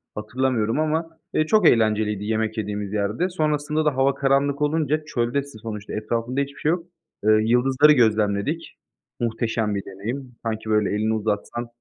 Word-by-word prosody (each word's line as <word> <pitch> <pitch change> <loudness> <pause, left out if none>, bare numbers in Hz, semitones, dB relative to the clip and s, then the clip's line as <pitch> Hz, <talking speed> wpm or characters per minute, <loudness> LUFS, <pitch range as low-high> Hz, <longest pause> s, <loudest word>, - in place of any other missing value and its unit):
hatırlamıyorum 115 +2 0
ama. 160 +1 0 0.2
Eee, 155 - +2
çok 215 +5 +5
eğlenceliydi 105 -2 +2
yemek 110 +1 -1
yediğimiz 105 -1 -3
yerde. 105 - 0
Sonrasında 155 -2 0
da 150 - +2
hava 135 +1 +3
karanlık 140 +1 +1
olunca, 155 0 +1
çöldesin 135 -1 -2
sonuçta, 105 -2 -6
etrafında 115 +5 -1
hiçbir 140 0 -5
şey 150 - 0
yok. 170 +1 0 0.4
Eee, 110 - +4
yıldızları 130 +5 +4
gözlemledik, 110 +5 +1 0.4
muhteşem 115 -2 -1
bir 100 - -4
deneyim. 120 +6 -6
Sanki, 110 -1 -3
böyle, 105 -2 +2
elini 110 +1 +1
uzatsan 110 +2 -2
120 Hz, 145 wpm, -23 LUFS, 110-140 Hz, 0.4 s, çok